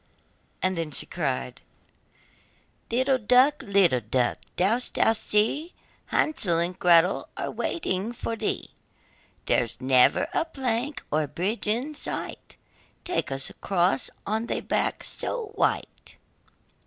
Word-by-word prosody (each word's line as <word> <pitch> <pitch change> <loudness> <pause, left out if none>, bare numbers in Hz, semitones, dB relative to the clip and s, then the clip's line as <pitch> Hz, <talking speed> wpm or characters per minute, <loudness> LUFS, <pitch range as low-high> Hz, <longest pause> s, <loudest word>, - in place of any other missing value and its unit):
Then 170 -4 0
she 145 - 0
cried: 135 -6 -3 1.3
'Little 260 +3 +2
duck, 255 +6 +4
little 195 -10 +3
duck, 120 +3 0 0.2
dost 225 +7 0
thou 225 - +4
see, 225 - 0 0.3
Hansel 215 - +1
and 175 +2 -1
Gretel 175 +1 +4
are - - -3
waiting 210 - -2
for 230 -1 -4
thee? 220 -1 -2 0.7
There's 115 -2 0
never 130 -1 +4
a - - +2
plank, 265 -2 -2
or 155 0 +1
bridge 200 - -2
in 245 +8 0
sight, - - -5 0.5
Take 350 - -1
us 135 0 -4
across 175 -8 0 0.2
on 220 +3 -1
thy - - -2
back - - -1
so 455 -4 -3
white. - - -1
205 Hz, 115 wpm, -26 LUFS, 165-255 Hz, 1.3 s, duck